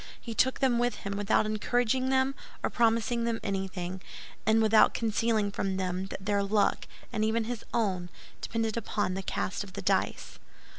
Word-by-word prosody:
He 230 - -6
took 260 +3 +2
them 250 -3 +3
with 245 0 +1
him, 200 0 -2
without 205 +1 +2
encouraging 245 +4 +1
them 265 0 +2 0.3
or - - 0
promising 230 0 +2
them 230 -1 -1
anything, 190 -2 -3 0.5
and 220 +1 +5
without 220 -1 +5
concealing 220 -2 +1
from 195 -1 -2
them 185 0 -2
that 195 -1 -7
their 205 -1 +2
luck, 200 +1 +1 0.3
and 215 - 0
even 220 +1 +1
his 230 0 -4
own, 190 -7 0 0.3
depended 225 -1 -1
upon 205 -4 -1
the 195 - -3
cast 190 +1 -2
of 195 -2 -12
the - - -5
dice. - - 0
215 Hz, 175 wpm, -29 LUFS, 195-230 Hz, 0.5 s, and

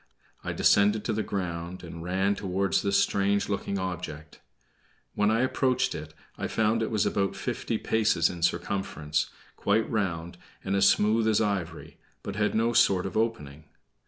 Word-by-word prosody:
I - - -3
descended 105 +1 +3
to 110 - 0
the 110 - 0
ground, 90 -3 -4
and 85 -1 -8
ran 95 +3 +1
toward 95 -1 -2
this 100 0 +2
strange 100 +1 +1
looking 100 0 -2
object. 90 -5 -6 0.7
When 105 0 +2
I 110 +2 +2
approached 130 0 +1
it 75 0 -8 0.2
I - - -2
found 110 +1 +1
it 110 - -1
was 105 -3 +1
about 100 -1 0
fifty - - -3
paces 110 -6 +2
in 85 -2 -6
circumference, 85 -3 -1 0.3
quite 110 +2 +1
round, 90 -5 -2 0.2
and 95 - -1
as 100 0 +5
smooth 110 +2 +2
as 110 -2 +3
ivory, 95 -6 -3 0.2
but 100 - -5
had 105 0 0
no 115 +2 +2
sort 95 -5 +4
of 95 - -5
opening. 80 -10 -2
100 Hz, 160 wpm, -27 LUFS, 85-110 Hz, 0.7 s, as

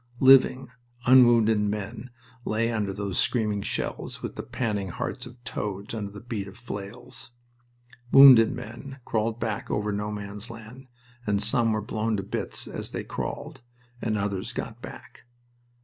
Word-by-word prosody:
Living, 130 -1 +6 0.4
unwounded 120 -4 +6
men 105 +3 -3 0.3
lay 115 +1 0
under 105 -3 -1
those 100 -1 -3
screaming 105 -4 +1
shells - - -4
with - - -5
the - - -4
panting 105 -6 -2
hearts 125 +8 -4
of 125 0 -13
toads 100 -3 -4
under 105 -3 -4
the 105 - -9
beat 110 -4 -4
of 100 - -12
flails. 120 +2 -8 0.8
Wounded 130 -5 +9
men 125 +5 -8
crawled 110 +1 -1
back 110 -3 -3
over 105 0 -1
No 105 +1 -2
Man's 105 +1 -7
Land, 115 +3 -11 0.4
and 100 -1 +2
some 115 +2 +3
were 110 0 0
blown 110 0 -1
to 100 - -3
bits 100 - -3
as - - -6
they - - -4
crawled, - - -5 0.4
and 110 -2 0
others 100 +3 -3
got 120 -1 -6
back. - - -11
110 Hz, 150 wpm, -26 LUFS, 105-120 Hz, 0.8 s, Wounded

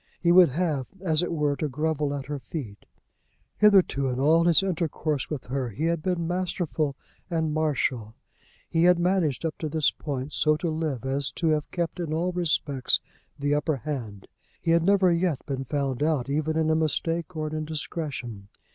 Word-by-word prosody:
He 170 - +3
would 180 -2 +8
have, 150 -3 -1
as 160 -4 +1
it 175 - -2
were, 150 -3 +1
to 155 - -1
grovel 150 +1 -1
at 135 -1 -5
her 145 +1 -4
feet. 130 -8 -7 0.7
Hitherto, 190 -10 +4
in 125 0 -2
all 160 +4 +4
his 175 +2 +5
intercourse 155 -6 -1
with 150 -4 -4
her, 130 -1 -3
he 115 +8 -5
had 170 -1 0
been 170 -1 -1
masterful 175 -5 -1 0.3
and 160 -3 0
marital. 130 -8 -1 0.5
He 165 +1 +2
had 180 0 +6
managed 175 -5 +1
up 160 - -3
to 155 - -3
this 155 -1 +2
point 140 -1 -5
so 155 -1 +3
to 170 0 -2
live 155 -6 -3
as 140 +1 -1
to 165 - 0
have 155 -1 0
kept 175 +1 -3
in 165 -3 -2
all 175 +3 0
respects 155 -6 +1 0.4
the 145 +1 0
upper 150 +1 +1
hand. 120 -8 -6 0.3
He 165 - 0
had 170 0 +4
never 190 0 +4
yet 170 -4 0
been 135 -1 -3
found 140 -2 -2
out 145 -4 +1
even 155 +2 0
in 160 0 +2
a - - +3
mistake 165 +2 -1
or 155 -1 -2
an - - -9
indiscretion. 150 -8 -5
155 Hz, 185 wpm, -26 LUFS, 140-170 Hz, 0.7 s, would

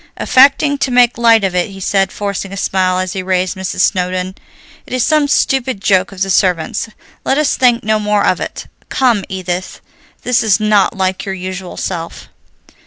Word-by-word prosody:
Affecting 280 +2 +3
to 275 - 0
make 245 -1 +3
light 230 -2 +4
of 190 -2 0
it, 180 +2 0
he 195 0 -11
said, 195 0 0
forcing 200 -1 -4
a 195 - -7
smile 185 -1 0
as 185 -1 -2
he 190 - -3
raised 185 +1 -1
Mrs. 190 -1 -3
Snowdon, 185 -1 0 0.5
"It - - -9
is 255 -2 +1
some 305 -2 +2
stupid 265 -5 0
joke 190 -1 +1
of 195 -1 -3
the 195 - -2
servants. 180 +3 0 0.3
Let 270 - 0
us 300 -1 +1
think 245 -2 +2
no 215 +1 +1
more 210 -1 +1
of - - +1
it. - - -6 0.2
Come, 240 -6 +1
Edith, 185 -1 -4 0.4
this 250 0 +2
is 220 -2 +2
not 210 -2 +2
like 190 0 -1
your 195 -1 -4
usual 185 0 -7
self." 170 -3 -5
195 Hz, 185 wpm, -15 LUFS, 185-235 Hz, 0.5 s, light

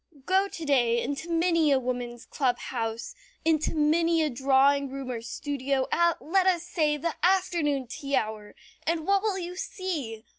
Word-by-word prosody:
Go 380 +2 +3
to 330 -4 -7
day 240 -5 +3
into 285 +7 -4
many 335 -2 +2
a 275 - +5
woman's 245 -1 -4
club 255 -4 0
house, 230 - -4 0.3
into 315 -1 +1
many 325 +2 +3
a 305 - 0
drawing 275 +2 +3
room 270 -1 -5
or 235 -2 -4
studio 270 +2 -2
at, 340 -1 +2
let 375 +4 +1
us 350 -3 +2
say, 310 -4 0
the 330 +3 -2
afternoon 345 -7 +2
tea 275 +3 -3
hour, 215 -3 -3 0.3
and 325 -1 0
what 395 +1 +3
will 415 -2 0
you 355 -1 -5
see? 295 - -4
295 Hz, 170 wpm, -27 LUFS, 255-340 Hz, 0.3 s, a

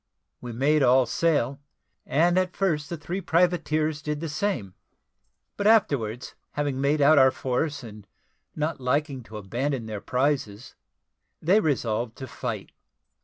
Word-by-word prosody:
We 125 - -6
made 145 +6 +2
all 130 0 +5
sail, 145 -5 0 0.5
and 170 +5 +3
at 185 0 +1
first 155 -7 0
the 170 - -4
three 175 +5 -4
privateers 160 -3 +1
did 150 0 -3
the 165 0 -4
same; 145 - -2 0.8
but 205 - +1
afterwards, 130 - +2 0.2
having 145 -2 -2
made 145 +2 +2
out 145 +1 +6
our 130 0 +7
force, 130 +2 -2
and 105 -3 -11 0.5
not 155 0 -2
liking 140 +1 0
to 110 -2 -10
abandon 120 +5 -2
their 105 -2 -5
prizes, 130 -4 -1 0.7
they 185 +7 +4
resolved 120 - -1
to 130 - -7
fight. - - -5
145 Hz, 140 wpm, -26 LUFS, 125-155 Hz, 0.8 s, our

